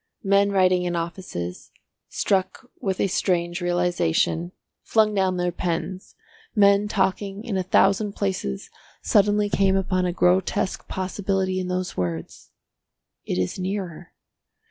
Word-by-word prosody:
Men 200 0 +3
writing 185 -2 +3
in 175 -1 -2
offices, 165 - -5 0.4
struck 195 +6 -1
with 190 -2 -2
a - - +3
strange 175 -2 0
realisation, 175 - +1 0.3
flung 215 -1 +2
down 190 -2 +1
their 180 0 0
pens, 180 +2 -4 0.4
men 200 0 +5
talking 195 0 -1
in 230 -4 -3
a 190 - +1
thousand 195 +2 +2
places 190 - -3 0.3
suddenly 205 0 +3
came 195 -1 +2
upon 185 -1 +1
a - - 0
grotesque 185 +2 +1
possibility 190 0 -1
in 185 - -3
those 180 -1 -2
words, 85 -2 -4 0.8
"It - - -1
is 90 - -2
nearer." 185 -3 -4
185 Hz, 125 wpm, -24 LUFS, 175-200 Hz, 0.8 s, men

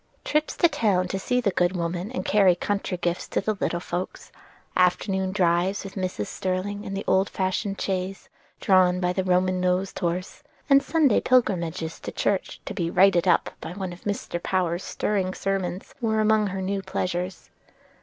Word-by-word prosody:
Trips 300 +1 0
to 340 - +6
town 200 - +1
to 195 - -2
see 250 +6 0
the 205 -5 +1
good 180 +1 +1
woman 175 +4 -3
and 255 - -4
carry 195 -4 +5
country 200 0 -2
gifts 175 0 -2
to - - 0
the 215 +2 0
little 175 - 0
folks; 175 +1 -5 0.4
afternoon 190 +1 +2
drives 180 0 +1
with 195 - -8
Mrs. 185 - -3
Sterling 190 - -3
in 195 - -5
the 195 - -3
old 190 +1 +2
fashioned 190 +1 -2
chaise, 190 0 -3 0.3
drawn 185 -2 +4
by 180 0 0
the 190 - 0
Roman 185 0 +2
nosed 185 +1 0
horse, 180 - -3 0.3
and 275 -1 +6
Sunday 290 -5 +3
pilgrimages 175 -9 +1
to - - -6
church 195 -2 -1
to - - -5
be 170 -2 -1
"righted 185 0 +4
up" 175 - +3
by - - -6
one 190 -2 -5
of 175 - -13
Mr. 200 -4 -3
Power's 180 -1 0
stirring 190 -3 -1
sermons, 190 -2 -3
were 220 -2 +1
among 215 -1 +3
her 190 0 -3
new 195 +1 -1
pleasures. 185 -1 -3
185 Hz, 175 wpm, -25 LUFS, 180-200 Hz, 0.4 s, to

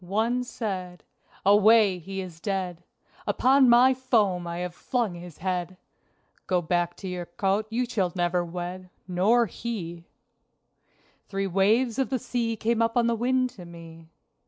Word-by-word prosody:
One 225 +7 0
said: 185 -7 -5 0.4
"Away! 205 -1 +5
he 195 +3 -5
is 175 -3 -9
dead! 185 -2 -3 0.5
Upon 265 0 +4
my 245 +2 +6
foam 215 -9 +1
I 170 0 -4
have 180 0 -4
flung 235 0 -2
his 175 -2 -10
head! 180 0 -3 0.7
Go 180 -1 +2
back 175 +1 -1
to 195 - -7
your 180 -1 -5
cote, 195 +4 -1
you 240 +3 0 0.3
never 175 0 +1
shall 175 - -2
wed! 180 +2 -6 0.2
(Nor 205 +7 +3
he!)" 175 -6 -6 1.2
Three 195 0 -2
waves 215 +6 +2
of 270 - +1
the 260 - 0
sea 230 -1 -2
came 225 +1 0
up 230 +1 +1
on 240 - +4
the 235 - +2
wind 255 +2 +1
to 185 - -12
me. 165 -1 -12
195 Hz, 155 wpm, -26 LUFS, 175-230 Hz, 1.2 s, my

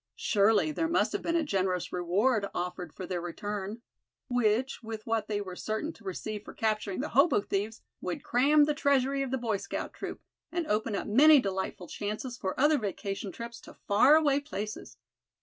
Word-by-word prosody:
Surely 210 +7 +3
there 325 +2 0
must 330 - +2
have - - -2
been 335 - -1
a 335 - +3
generous 185 - -1
reward 200 +5 +1
offered 180 -1 -4
for 185 - -7
their 180 -1 -3
return; 205 +5 -5 0.5
which, 245 +1 +1
with 220 -1 -6
that 225 -2 -1
they 210 -1 -1
were 185 -3 -6
certain 220 - -3
to 230 - -19
receive 205 +2 -5
for - - -11
capturing 215 -2 -1
the 300 - -3
hobo 275 0 +4
thieves, 205 +2 -3 0.2
would 180 - -4
cram 285 +5 +4
the 300 +1 +2
treasury 275 -2 +2
of 270 - -2
the 265 - 0
Boy 230 -4 -1
Scout - - -5
troop, - - -6 0.3
and 340 -1 -1
open 215 -3 0
up - - -2
many 290 +7 +7
delightful 190 -4 -3
chances 215 +7 -4
for 190 -3 -4
other 295 +1 +4
vacation 200 -1 -4
trips 235 +2 -8
to - - -13
far 240 +8 +6
away 290 -3 +4
places. 215 -7 -6
220 Hz, 185 wpm, -29 LUFS, 200-270 Hz, 0.5 s, many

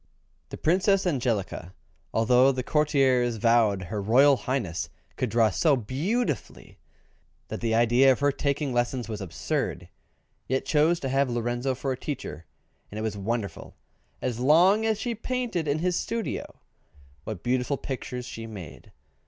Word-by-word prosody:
The - - -7
Princess 190 +4 +2
Angelica, 115 - -2 0.4
although 125 +4 +4
the 130 -1 -3
courtiers 135 -5 +2
vowed 110 -3 +3
her 100 +4 -4
Royal 135 +7 +5
Highness 120 -10 -3 0.3
could 130 - -1
draw 115 -1 +3
so 150 - +3
beautifully 145 - -3 0.7
that - - -5
the 115 -1 +1
idea 120 +3 +5
of 130 - 0
her 145 0 +3
taking 140 -1 -1
lessons 120 0 -1
was 110 -2 -5
absurd, 90 -4 -3 0.6
yet 130 +1 -1
chose 160 +2 +3
to 135 - -2
have 135 0 +2
Lorenzo 120 +2 -1
for 135 +1 -3
a 130 - -2
teacher, 110 - -6 0.4
and 105 - -7
it 110 - -3
was 110 -2 -2
wonderful, 105 +1 -4 0.5
as 120 -2 -2
long 180 - +5
as 220 -2 0
she 240 +1 -2
painted 230 -7 -2
in 145 +1 +1
his 180 +2 0
studio, 230 +4 -4 0.6
what 100 +2 -6
beautiful 125 +3 0
pictures 125 -2 -5
she 115 -2 -7
made! 95 -8 -10
130 Hz, 150 wpm, -26 LUFS, 115-150 Hz, 0.7 s, Royal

